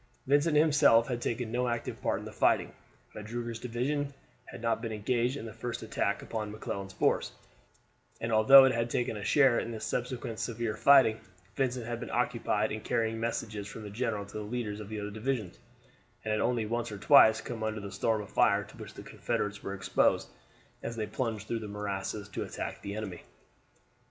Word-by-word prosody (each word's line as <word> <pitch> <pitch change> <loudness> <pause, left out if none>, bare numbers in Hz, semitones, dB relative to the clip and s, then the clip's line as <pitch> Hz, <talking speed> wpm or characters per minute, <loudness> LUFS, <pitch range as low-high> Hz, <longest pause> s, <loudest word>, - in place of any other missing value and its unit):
Vincent 145 +3 +3
himself 145 -7 +5
had 120 -1 -2
taken 115 -1 -2
no 125 +1 0
active 120 -1 -3
part - - 0
in - - -8
the - - -7
fighting. - - +2 0.4
Magruder's 115 +2 -5
division 140 +4 -2 0.3
had - - -10
not 115 0 0
been 115 -1 -4
engaged 120 +4 0
in 115 - -7
the 110 - -7
first 120 +1 -5
attack 110 -2 -1
upon 110 -2 -4
McClellan's 100 -2 -5
force; - - +1 0.9
and 115 - -3
although 130 +5 +9
it 130 - +3
had 115 0 0
taken 120 -1 -1
a 105 - -6
share 135 -2 +4
in - - -4
the 115 -2 -5
subsequent 120 -1 -3
severe 115 -2 -2
fighting, 130 -6 +6 0.4
Vincent 125 -3 -1
had 120 0 -4
been - - -6
occupied 115 -3 0
in 110 - -4
carrying 115 0 -1
messages 110 -3 -3
from 110 +1 -8
the 105 - -7
general 110 -2 -2
to 100 - -9
the 105 - -4
leaders 105 -1 -4
of 105 -1 -8
the 110 -1 -4
other 105 0 -5
divisions, 110 - -3 0.7
and 110 - -1
had 105 - +1
only 120 -3 +1
once 115 +1 -2
or 105 - -5
twice 110 -1 +7
come 115 -2 -6
under 110 0 -2
the 100 -1 -7
storm 105 +2 0
of 100 - -12
fire - - +3
to - - -15
which - - -10
the - - -9
Confederates 105 -1 -3
were 100 - -4
exposed 95 - +1 0.5
as 115 - -5
they 110 -2 -2
plunged 110 -2 -3
through 115 - -1
the 110 - -6
morasses 100 0 -4
to 95 - -5
attack - - -5
the 100 0 -5
enemy. 100 -5 -5
115 Hz, 200 wpm, -30 LUFS, 105-120 Hz, 0.9 s, although